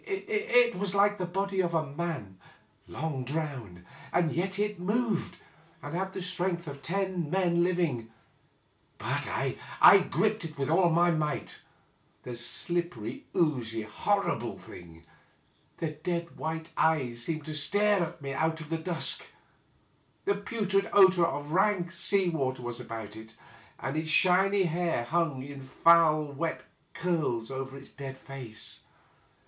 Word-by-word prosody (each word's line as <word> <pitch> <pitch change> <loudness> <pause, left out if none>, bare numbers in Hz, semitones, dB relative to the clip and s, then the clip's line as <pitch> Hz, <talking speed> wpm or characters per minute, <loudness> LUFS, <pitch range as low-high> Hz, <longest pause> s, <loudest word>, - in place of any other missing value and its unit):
It 430 +4 +2
was 200 -1 -1
like 205 0 +4
the 180 - -2
body 195 +1 0
of 170 -2 -1
a 160 -1 +2
man 140 - -5 0.5
long 145 -3 -3
drowned, 125 - -4 0.3
and 170 -2 +2
yet 190 +3 -1
it 210 -2 -1
moved, 210 +1 -1 0.5
and 145 - -6
had 190 +2 -2
the 190 - -4
strength 180 -1 -2
of 140 -2 -8
ten 185 0 -1
men 175 -1 +2
living; 170 -11 0 0.9
but - - -2
I 195 -1 +4
gripped 215 0 +1
it 155 -3 -7
with 140 +2 -1
all 175 +1 +5
my 170 +1 +4
might 155 -2 -2 0.3
— - - -38
the 125 - -6
slippery, 125 -1 -3
oozy, 120 -9 +1
horrible 200 - -1
thing 85 -2 -13 0.4
— - - -35
^the 155 -2 -4
dead 170 -1 -2
white 160 +1 -4
eyes 130 -7 +1
seemed 155 +3 -3
to 155 - -5
stare 205 +7 +2
at 165 -2 -4
me 135 0 -3
out 160 +3 0
of 155 -2 -9
the 165 - 0
dusk; 165 0 0 1.0
the 200 - +3
putrid 200 -1 -1
odor 190 -3 +7
of 145 -2 -4
rank 185 -1 +2
sea 190 +3 +2
water 130 -6 -1
was 120 0 -5
about 110 -3 -7
it, 110 0 -11 0.4
and 135 - -4
its 155 0 -2
shiny 190 +4 +4
hair 170 -6 0
hung 150 -1 0
in 140 0 -8
foul 155 +3 +5
wet 165 +4 -3 0.3
curls 150 -10 -1
over 135 0 -5
its 135 - -13
dead 135 -1 -7
face. 130 -5 -9
165 Hz, 150 wpm, -29 LUFS, 135-185 Hz, 1.0 s, odor